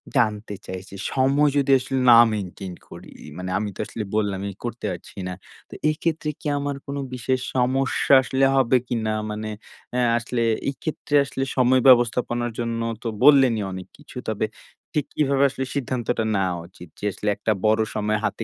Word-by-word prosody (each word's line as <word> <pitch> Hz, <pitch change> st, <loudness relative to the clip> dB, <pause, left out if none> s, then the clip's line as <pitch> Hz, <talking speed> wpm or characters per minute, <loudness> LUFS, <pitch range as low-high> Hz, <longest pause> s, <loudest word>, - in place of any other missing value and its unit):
জানতে 105 Hz, -2 st, +1 dB
চাইছি। 95 Hz, +1 st, -7 dB, 0.2 s
সময় 140 Hz, +3 st, +3 dB
যদি 140 Hz, -1 st, +2 dB
আসলে 135 Hz, +1 st, -3 dB
না 115 Hz, -, +9 dB, 0.2 s
মেইনটেইন 95 Hz, -2 st, -5 dB, 0.2 s
করি। -, -, -11 dB, 0.3 s
মানে 90 Hz, 0 st, -5 dB
আমি 105 Hz, 0 st, -2 dB
তো -, -, -16 dB
আসলে 110 Hz, -, -5 dB
বললামই 100 Hz, -2 st, -1 dB
করতে 120 Hz, -2 st, -5 dB
পারছি 85 Hz, -, -12 dB
না। 90 Hz, -, -4 dB, 0.4 s
তো -, -, -12 dB, 0.2 s
এইক্ষেত্রে 155 Hz, 0 st, -1 dB
কি -, -, -5 dB
আমার 145 Hz, 0 st, -2 dB
কোনো 140 Hz, 0 st, -4 dB
বিশেষ 130 Hz, +1 st, -1 dB, 0.2 s
সমস্যা 130 Hz, +2 st, +2 dB
আসলে 130 Hz, +1 st, +2 dB
হবে 130 Hz, -1 st, +3 dB
কিনা? 110 Hz, -2 st, -1 dB, 0.2 s
মানে 110 Hz, +1 st, -4 dB, 0.4 s
অ্যা 125 Hz, -, +1 dB, 0.2 s
আসলে 120 Hz, +1 st, -2 dB, 0.3 s
এইক্ষেত্রে 145 Hz, +1 st, -3 dB
আসলে 135 Hz, 0 st, -3 dB
সময় 130 Hz, +1 st, +4 dB
ব্যবস্থাপনার 120 Hz, -1 st, +4 dB
জন্য 115 Hz, -1 st, -2 dB, 0.2 s
তো 115 Hz, -, -3 dB, 0.2 s
বললেনই 130 Hz, -7 st, +6 dB
অনেক 95 Hz, 0 st, -7 dB
কিছু। 145 Hz, -3 st, -13 dB
তবে 110 Hz, 0 st, 0 dB, 0.5 s
ঠিক 150 Hz, -3 st, 0 dB
কিভাবে 140 Hz, -2 st, +2 dB
আসলে 135 Hz, 0 st, -4 dB
সিদ্ধান্তটা 120 Hz, -3 st, -1 dB
নেওয়া 95 Hz, -2 st, 0 dB
উচিত? 90 Hz, -1 st, -13 dB
যে -, -, -5 dB
আসলে 105 Hz, -, -3 dB
একটা 110 Hz, -, -1 dB
বড় 110 Hz, +1 st, +4 dB
সময় 105 Hz, 0 st, 0 dB
হাতে 115 Hz, -, -2 dB
120 Hz, 165 wpm, -23 LUFS, 105-135 Hz, 0.5 s, না